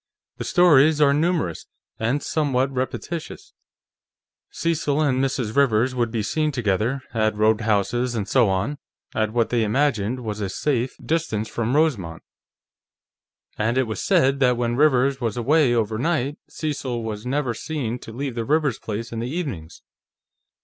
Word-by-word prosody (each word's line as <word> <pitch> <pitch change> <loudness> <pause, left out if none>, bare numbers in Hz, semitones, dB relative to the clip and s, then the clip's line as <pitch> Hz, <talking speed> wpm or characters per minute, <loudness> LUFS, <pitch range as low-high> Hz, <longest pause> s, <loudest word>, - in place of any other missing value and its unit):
The - - -5
stories 155 -4 +5
are 140 -2 +5
numerous, 155 - 0 0.3
and 125 +6 0
somewhat 135 -4 0
repetitious; 165 - -5 1.0
Cecil 155 -3 -1
and 135 -4 +2
Mrs. 125 -5 -2
Rivers 125 -2 +3
would 120 -2 0
be 110 -1 -2
seen 155 +8 0
together, 120 +2 -1
at 110 -2 +1
roadhouses 110 +3 +1
and 105 -3 -2
so 120 -2 +3
on, 100 +10 -1 0.3
at 110 -1 0
what 115 0 +1
they 120 -2 +2
imagined 125 0 0
was 110 -2 -4
a 100 - -2
safe 125 +4 -1
distance 155 -10 -1
from 120 +3 -2
Rosemont, 115 - 0 1.4
and 115 +4 +1
it 130 - +4
was 110 -1 -4
said 135 +1 +3
that 125 -2 +3
when 120 -1 0
Rivers 135 -1 +3
was 115 -1 -2
away 140 +2 +3
over 110 -1 0
night, 150 -1 -1
Cecil 135 -6 -3
was 110 -1 -5
never 135 -2 0
seen 125 -4 -4
to 115 - -10
leave 135 +3 -4
the 115 -1 -3
Rivers 145 -2 +1
place 110 +2 -5
in 115 - -4
the 120 +2 -3
evenings. 130 - -5
125 Hz, 155 wpm, -23 LUFS, 110-145 Hz, 1.4 s, stories